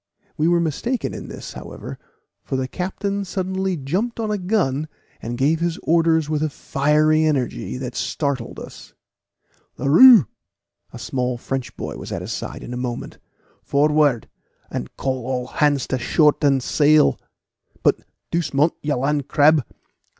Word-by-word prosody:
We 155 -1 +1
were 175 0 +3
mistaken 170 - -2
in - - -7
this, - - -8
however, - - -9 0.4
for 135 - -4
the 130 0 -1
captain 200 +5 -3
suddenly 190 -1 -2
jumped 185 - -2
on 220 -2 -1
a 210 - -1
gun, 175 -7 0 0.3
and 120 +1 -5
gave 150 +5 +2
his 170 -1 -1
orders 165 -1 +3
with 155 -1 -1
a 155 - +1
fiery 150 +3 +2
energy 135 -4 -1
that 125 -1 -5
startled 140 -6 -3
us. - - -11 0.8
"Leroux!" 205 - +8 0.7
A - - -9
small 125 -1 -2
French 130 +1 -5
boy - - -5
was - - -8
at - - -4
his - - -6
side - - -6
in 125 - -7
a - - -4
moment. 125 -1 -5 0.4
"Forward, 145 -4 +2 0.4
and 60 - -4
call 130 -2 -2
all 125 -1 -2
hands 145 -1 +1
to 130 - -1
shorten 145 0 +3
sail; 150 +3 +3 0.6
but, - - +4 0.3
doucement, 150 -2 +1
you 145 0 -1
land 140 +2 -1
crab! 150 -1 +4
150 Hz, 150 wpm, -21 LUFS, 135-170 Hz, 0.8 s, Leroux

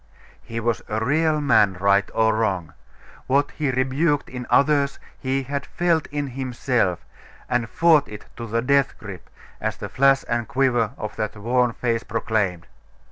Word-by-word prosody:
He 115 0 -6
was 115 0 -1
a 110 +1 -1
real 155 +3 +2
man, 105 -9 +3
right 100 +1 +3
or 110 0 +3
wrong. 95 -8 -1 0.5
What 140 +2 +2
he 150 -3 -2
rebuked 135 +4 0
in 125 -1 -7
others, 140 -1 +3 0.2
he 135 +1 -1
had 140 +1 -3
felt 170 -3 0
in 145 0 -3
himself, 125 -7 -1 0.4
and 120 -2 -1
fought 160 0 +4
it 105 0 -10
to 115 -1 -6
the 115 +2 -1
death 140 +1 +2
grip, 100 -4 -10 0.3
as - - -2
the - - -6
flash 135 0 +3
and 120 -1 -1
quiver 120 -3 +1
of 105 -1 -6
that 110 0 -3
worn 120 +3 +1
face 115 -1 -1
proclaimed.... 105 -6 -1
125 Hz, 160 wpm, -23 LUFS, 110-140 Hz, 0.5 s, fought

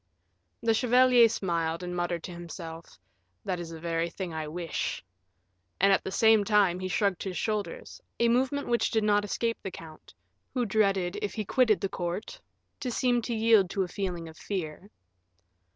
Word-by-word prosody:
The 225 -1 +3
chevalier 245 0 +5
smiled, 170 -4 -1
and 180 0 -4
muttered 175 -1 -2
to - - -6
himself, 170 - -9 0.5
"That 180 -2 -2
is 170 -1 -6
the 165 -1 -8
very 165 0 -1
thing 180 -1 -6
I 155 -1 -4
wish." 165 - -3 0.8
And 195 +1 +5
at - - +2
the - - -4
same 220 +1 +5
time 200 -4 +3
he 185 - -3
shrugged 190 -1 0
his 190 -2 -4
shoulders, 220 - -3 0.2
a 235 - +4
movement 260 +4 +1
which 235 -1 +2
did 220 -2 +1
not 205 -1 +3
escape 230 +3 -1
the 195 - -4
count, 160 - -12 0.4
who 245 -2 +1
dreaded, 195 -4 +1
if 205 - -3
he 215 -2 -3
quitted 230 -2 +3
the 195 - 0
court, 180 - -4 0.4
to 255 - -3
seem 245 0 +1
to 235 0 -3
yield 220 -4 +4
to 195 0 0
a - - -4
feeling 180 -3 -4
of 160 0 -12
fear. 185 0 -5
195 Hz, 180 wpm, -28 LUFS, 175-225 Hz, 0.8 s, chevalier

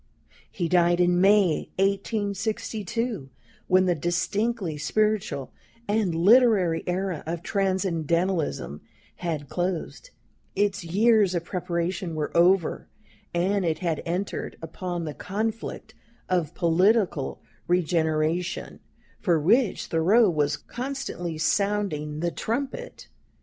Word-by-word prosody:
He 175 -3 -2
died 175 0 +3
in 175 0 +3
May, 195 -4 +4
1862, 205 - -2 0.4
when 185 0 +4
the 180 - +3
distinctly 185 +3 -1
spiritual 215 - 0 0.4
and 205 -5 +1
literary 195 -2 +4
era 180 -2 -1
of 170 0 -4
Transcendentalism 175 - -1 0.4
had 160 -5 -3
closed, 180 - -3 0.5
its 200 -2 0
years 205 +2 +3
of 170 - -1
preparation 175 -1 -2
were 150 -1 -3
over, 175 0 +3 0.4
and 190 +3 +1
it 160 -2 0
had 170 -4 -2
entered 180 +4 -3
upon 175 +1 -5
the 150 - -4
conflict 220 +3 -4 0.3
of 175 -4 0
political 180 - +2 0.3
regeneration, 165 -1 0 0.4
for 170 -5 +2
which 210 - +2
Thoreau 190 +6 +4
was 150 -2 0
constantly 245 - -5
sounding 155 -4 0
the 170 0 0
trumpet. 280 - -4
180 Hz, 100 wpm, -26 LUFS, 165-205 Hz, 0.5 s, May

